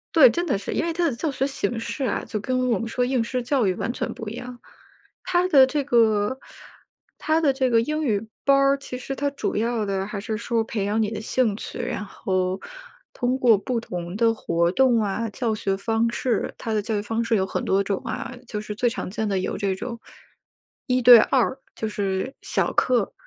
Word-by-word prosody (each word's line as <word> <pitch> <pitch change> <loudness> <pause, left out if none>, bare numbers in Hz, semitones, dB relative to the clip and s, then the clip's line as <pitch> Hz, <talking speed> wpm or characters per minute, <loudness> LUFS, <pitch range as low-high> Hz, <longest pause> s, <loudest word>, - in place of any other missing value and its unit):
对， 280 -6 +9
真 345 +10 -1
的 270 - +1
是， 195 - -5
因 - - 0
为 335 - -1
它 340 +1 0
的 250 - -4
教 305 +5 -2
学 270 0 0
形 240 -4 -2
式 270 +4 -4
啊， 255 - -1
就 220 - -3
跟 255 +3 0
我 230 - +2
们 230 - -4
说 245 +2 0
应 250 -2 +1
试 250 +2 -2
教 245 -1 +1
育 190 - +2
完 230 - -2
全 - - -3
不 225 - -8
一 - - -7
样， 250 0 -8 0.6
它 360 0 +1
的 275 -7 +7
这 285 +2 -1
个 225 -2 +3 0.8
它 315 +1 +1
的 295 -4 +3
这 260 -1 +1
个 230 -1 +4
英 305 +6 -2
语 220 -5 0 0.2
班 275 - +5
儿 275 0 +4
其 275 -2 -7
实 265 +2 -5
它 285 +1 0
主 280 - -3
要 230 0 0
的 195 -1 -1
还 205 0 -5
是 220 +2 -3
说 230 0 0
培 215 -2 -3
养 210 +3 0
你 215 - +1
的 215 - -4
兴 220 -1 +1
趣， - - -7
然 245 -4 -3
后 185 -2 -2 0.5
通 250 +1 0
过 235 -4 +5
不 235 +4 -2
同 175 -4 -6
的 230 0 +3
活 170 -5 0
动 255 0 +4
啊， 215 +2 -2
教 225 0 -2
学 195 -2 -1
方 225 +3 0
式， 235 -2 -1
它 225 - -4
的 215 - +1
教 215 +1 -2
育 - - -1
方 225 +2 -2
式 230 0 +1
有 190 - +1
很 190 - -3
多 195 +1 +2
种 200 -1 -2
啊， 255 0 -5
就 210 - -4
是 210 0 -6
最 240 +3 +2
常 230 - -5
见 215 +3 -2
的 195 -1 0
有 185 - -3
这 200 -2 0
种 235 +4 -6 0.9
一 255 0 +2
对 240 -1 +10
二， 260 +3 +2 0.2
就 220 - -4
是 200 +4 -2
小 - - 0
课， 250 -1 +2
230 Hz, 245 characters per minute, -24 LUFS, 210-255 Hz, 0.9 s, 对